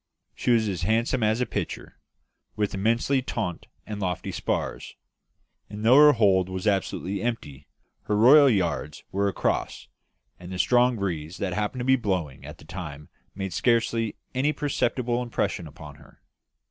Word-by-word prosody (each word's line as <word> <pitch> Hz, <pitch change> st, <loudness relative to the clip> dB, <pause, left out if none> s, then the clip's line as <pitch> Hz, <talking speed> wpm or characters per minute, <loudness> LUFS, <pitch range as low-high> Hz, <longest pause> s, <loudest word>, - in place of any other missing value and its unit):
She -, -, -3 dB
was 115 Hz, -2 st, +3 dB
as 95 Hz, -4 st, -3 dB
handsome 115 Hz, +6 st, +1 dB
as 110 Hz, +2 st, +1 dB
a -, -, +2 dB
picture; -, -, -5 dB, 0.6 s
with 105 Hz, -1 st, -1 dB
immensely 115 Hz, +7 st, +1 dB
taunt 90 Hz, -9 st, -4 dB, 0.2 s
and 105 Hz, -1 st, -6 dB
lofty 90 Hz, -2 st, -3 dB
spars; -, -, -3 dB, 0.7 s
and 105 Hz, +1 st, -6 dB
though 125 Hz, +4 st, +7 dB
her 150 Hz, 0 st, +8 dB
hold 95 Hz, -6 st, +3 dB
was 95 Hz, +1 st, -5 dB
absolutely 100 Hz, -1 st, -1 dB
empty, 75 Hz, -, -4 dB, 0.4 s
her 105 Hz, -, 0 dB
royal 140 Hz, +6 st, +7 dB
yards 85 Hz, -, -1 dB
were 100 Hz, +1 st, 0 dB
across, 100 Hz, -, -2 dB, 0.5 s
and 90 Hz, +1 st, -10 dB
the 90 Hz, -, -5 dB
strong 120 Hz, +7 st, +3 dB
breeze 90 Hz, -4 st, -4 dB
that 95 Hz, -3 st, -2 dB
happened 105 Hz, +5 st, -2 dB
to -, -, -3 dB
be 130 Hz, 0 st, +4 dB
blowing 85 Hz, -, -3 dB
at 75 Hz, +3 st, -10 dB
the -, -, -16 dB
time 75 Hz, -4 st, -8 dB, 0.3 s
made 95 Hz, -1 st, -4 dB
scarcely 115 Hz, -2 st, +1 dB, 0.2 s
any 135 Hz, +4 st, +1 dB
perceptible 125 Hz, -4 st, -1 dB
impression 115 Hz, -7 st, -2 dB
upon 75 Hz, -1 st, -12 dB
her. 75 Hz, -, -20 dB
105 Hz, 160 wpm, -25 LUFS, 90-120 Hz, 0.7 s, her